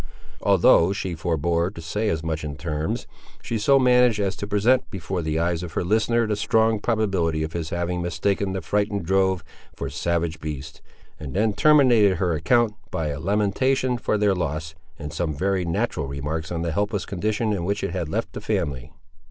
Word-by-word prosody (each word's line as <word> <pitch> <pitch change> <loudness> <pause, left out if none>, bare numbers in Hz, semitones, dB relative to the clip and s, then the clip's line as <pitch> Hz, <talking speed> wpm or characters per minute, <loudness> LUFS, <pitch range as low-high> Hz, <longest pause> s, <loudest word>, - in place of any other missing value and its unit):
Although 85 +4 +5
she 95 -3 -3
forebore 85 +1 0
to 100 - -11
say 105 +7 -2
as 80 -4 -2
much 80 -1 -3
in 75 -2 -4
terms, 75 -1 -3 0.4
she 115 - -2
so 135 +6 +4
managed 125 -3 +4
as 100 -1 0
to 100 - -5
present 105 +6 +2
before 95 -2 -4
the 80 -1 -1
eyes 85 0 0
of 85 -2 -7
her - - -1
listener 110 +5 +2
the 105 -1 0
strong 110 +1 +2
probability 95 -9 0
of 80 - -5
his 85 -2 -3
having 85 +1 -2
mistaken 95 +2 -1
the 95 - -3
frightened 100 +1 -1
drove 95 -1 +2 0.3
for 70 -1 -5
savage 85 +2 -1
beasts, 75 -2 -7 0.4
and 75 -4 -7
then 105 +1 +2
terminated 120 -8 +5
her 90 0 0
account 110 +8 +2 0.2
by 80 -4 -2
a 75 +1 -4
lamentation 105 +8 +1
for 110 -2 0
their 105 -1 +3
loss, 80 -2 -3 0.2
and 75 -2 -7
some 80 -4 -2
very 95 +3 0
natural 85 -4 -1
remarks 75 +4 -4
on 85 -1 -2
the 85 - -1
helpless 100 +3 -1
condition 105 +3 -1
in 95 -4 -2
which 100 +3 -1
it - - -1
had 85 -3 -3
left - - -3
the - - -6
family. 70 0 -2
90 Hz, 190 wpm, -24 LUFS, 80-105 Hz, 0.4 s, Although